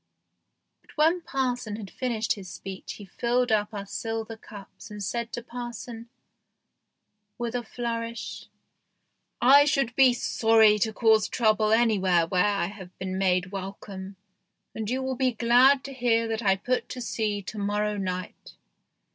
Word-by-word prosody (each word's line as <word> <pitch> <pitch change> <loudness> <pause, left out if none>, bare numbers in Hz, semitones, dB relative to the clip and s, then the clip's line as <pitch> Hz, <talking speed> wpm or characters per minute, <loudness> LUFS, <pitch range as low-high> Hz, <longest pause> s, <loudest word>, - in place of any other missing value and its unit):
But - - -21
when 325 +4 +3
parson 255 -8 -2
had 210 -3 -8
finished 230 -4 -2
his 190 -3 -10
speech 190 +1 -7
he 205 - -11
filled 245 +5 0
up 210 -1 +1
our 200 -2 -6
silver 225 +2 -4
cups 210 0 -12
and 210 -1 -7
said 235 +3 -3
to 240 - -4
parson, 240 -1 -7 1.3
with 240 -1 -3
a 245 - -1
flourish, 230 -1 -5 0.5
" - - -42 0.2
I 285 - +5
should 275 -5 0
be 265 -2 +6
sorry 220 -3 +4
to 220 +2 +1
cause 220 -1 +3
trouble 215 -2 +2
anywhere 195 -7 +3
where 180 +1 +1
I 205 -1 +1
have 190 -3 -10
been 190 0 -4
made 185 -1 +1
welcome, 195 0 -7 0.6
and 220 -1 -4
you 260 +2 -1
will 260 0 -1
be 255 0 +1
glad 245 +4 +5
to 275 - -7
hear 235 -3 +1
that 225 0 -2
I 195 -3 +3
put 245 +5 -2
to 255 - -6
sea 215 -4 -2
to 210 +3 -7
morrow 210 +1 0
night. 185 -2 -5
225 Hz, 155 wpm, -26 LUFS, 200-240 Hz, 1.3 s, be